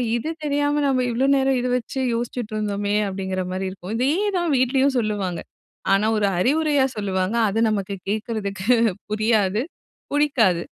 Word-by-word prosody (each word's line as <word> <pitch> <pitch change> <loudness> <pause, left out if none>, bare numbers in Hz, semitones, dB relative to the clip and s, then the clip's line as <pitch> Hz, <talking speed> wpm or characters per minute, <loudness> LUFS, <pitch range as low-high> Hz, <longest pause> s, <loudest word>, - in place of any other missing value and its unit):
இது 240 +7 -2
தெரியாம 290 0 +1
நம்ம 260 -2 +2
இவ்வளோ 245 +3 +1
நேரம் 270 -1 +2
இத 250 - -1
வச்சு 250 +2 -5
யோசிச்சுட்டு 235 -1 -3
இருந்தோமே." 205 -1 -1
அப்படிங்கிற 190 -1 -3
மாரி 190 0 -2
இருக்கும். 185 +2 -7
இதேதான் 345 - +1
வீட்லயும் 265 +2 +2
சொல்லுவாங்க. 205 -6 -2 0.5
ஆனா, 195 +2 +3
ஒரு 205 -1 +2
அறிவுரையா 290 - +2
சொல்லுவாங்க. 190 0 -1
அது 210 +3 -1
நமக்கு 200 -2 -2 0.2
கேட்கறதுக்கு 210 -2 -3 0.4
புரியாது. 215 -1 +2 0.5
புடிக்காது. 245 - +2
220 Hz, 135 wpm, -22 LUFS, 200-270 Hz, 0.5 s, ஆனா